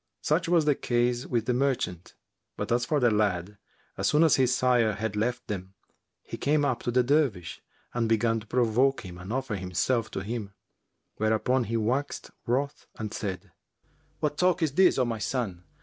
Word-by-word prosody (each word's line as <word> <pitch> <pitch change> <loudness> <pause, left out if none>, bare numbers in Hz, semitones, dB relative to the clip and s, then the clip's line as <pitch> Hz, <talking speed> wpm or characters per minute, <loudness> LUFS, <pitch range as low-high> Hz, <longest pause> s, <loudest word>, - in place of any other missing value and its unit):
Such 165 +3 +1
was 170 -3 +4
the 150 - +4
case 120 -1 0
with 115 -3 0
the 125 - +1
merchant; 125 -10 -1 0.4
but - - -3
as 120 0 +1
to 150 - +2
the 120 -3 +4
lad, 100 -2 0 0.4
as - - 0
soon 150 +2 +4
as 160 - +5
his 130 -2 +3
sire 125 -4 +3
had 110 0 -3
left 120 +4 -1
them, 95 -2 -5 0.5
he - - -7
came 145 0 +2
up 125 -4 0
to - - -3
the 125 +1 +3
Dervish 120 - 0 0.3
and 115 -2 0
began 115 0 +2
to 110 - -14
provoke 125 +3 +2
him 90 -1 -9
and 90 +3 -8
offer 130 -3 -2
himself 100 +6 -1
to - - -4
him, 105 -1 -5 0.6
whereupon 110 +4 +1
he 115 +1 -1
waxed 125 +6 -2 0.2
wroth 140 +4 -1
and 110 -2 -5
said, 95 -2 -5 0.7
"What 150 -1 -1
talk 180 -1 +3
is 155 - +1
this, 185 +5 +4
O 130 - +3
my 115 -2 -3
son? 100 -7 -3
120 Hz, 185 wpm, -27 LUFS, 105-135 Hz, 0.7 s, as